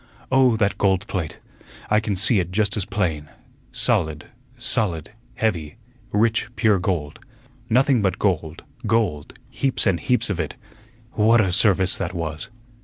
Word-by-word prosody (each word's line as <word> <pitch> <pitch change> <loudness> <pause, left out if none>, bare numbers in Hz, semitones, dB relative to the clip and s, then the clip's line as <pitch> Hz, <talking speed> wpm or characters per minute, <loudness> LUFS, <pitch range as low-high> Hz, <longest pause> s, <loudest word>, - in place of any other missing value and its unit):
Oh, 130 -4 +4
that 105 -2 0
gold 95 -1 +2
plate! 90 -8 -4 0.5
I 105 - +5
can 105 -2 -2
see 100 +3 +3
it 90 -1 -3
just 100 +1 0
as 105 -4 -2
plain 80 -7 -2 0.4
solid, 75 -1 0 0.3
solid, 105 - -1 0.2
heavy, 90 -8 -1 0.4
rich, 110 +1 +1
pure 110 -6 +3
gold; 85 -5 -2 0.5
nothing 130 +1 +3
but 95 -2 0
gold, 85 -5 -1 0.2
gold, 105 -10 -1
heaps 135 -2 0
and 90 -3 +2
heaps 125 0 +1
of 90 - -3
it. 80 -3 -3 0.6
What 115 +2 +4
a 95 -4 +2
service 95 -1 +3
that - - -3
was!" 80 -2 -4
100 Hz, 145 wpm, -22 LUFS, 85-110 Hz, 0.6 s, I